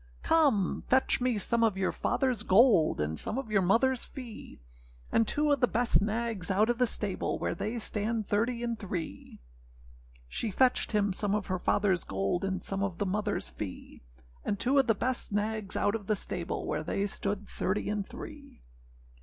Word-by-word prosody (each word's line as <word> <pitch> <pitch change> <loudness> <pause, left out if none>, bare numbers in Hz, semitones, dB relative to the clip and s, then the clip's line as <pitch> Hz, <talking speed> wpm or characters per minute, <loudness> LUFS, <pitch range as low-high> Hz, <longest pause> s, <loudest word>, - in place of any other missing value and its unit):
âCome, 275 - +2
fetch 260 0 +3
me 245 -3 +1
some 230 +3 +1
of 215 -4 +2
your 190 -1 +1
fatherâs 250 -5 0
gold, 200 -4 +5
And 75 +1 -1
some 230 - -3
of 265 -5 -4
your 200 -2 +3
motherâs 235 +7 +2
fee; 240 - -9 0.5
And 225 -1 +3
two 295 0 +2
of 285 - +3
the 245 - +4
best 240 -2 +2
nags 215 -2 -2
out 210 +4 +3
of 240 - -4
the 250 - +4
stable, 205 -3 -1
Where - - -2
they 215 +7 -3
stand 220 0 -2
thirty 235 +4 0
and 235 -1 -2
three.â 180 -5 -6 0.9
She 220 - -2
fetched 250 +3 +2
him 205 -2 +2
some 205 +1 0
of 210 - -2
her 185 -2 -2
fatherâs 190 -2 +1
gold, 95 - -1
And 190 -1 -2
some 195 0 -3
of 195 -3 -2
the 205 - -1
motherâs 205 +2 -1
fee; 100 -3 -8 0.4
And 205 - -2
two 270 +5 +3
of 270 - +3
the 225 - +3
best 250 +2 -2
nags 210 -1 -2
out 205 - +1
of 210 -4 -4
the 215 - +2
stable, 175 -3 -3
Where - - -1
they 195 +5 -1
stood 200 0 -3
thirty 190 +3 -2
and 210 -1 -1
three. - - -11
210 Hz, 185 wpm, -30 LUFS, 195-235 Hz, 0.9 s, gold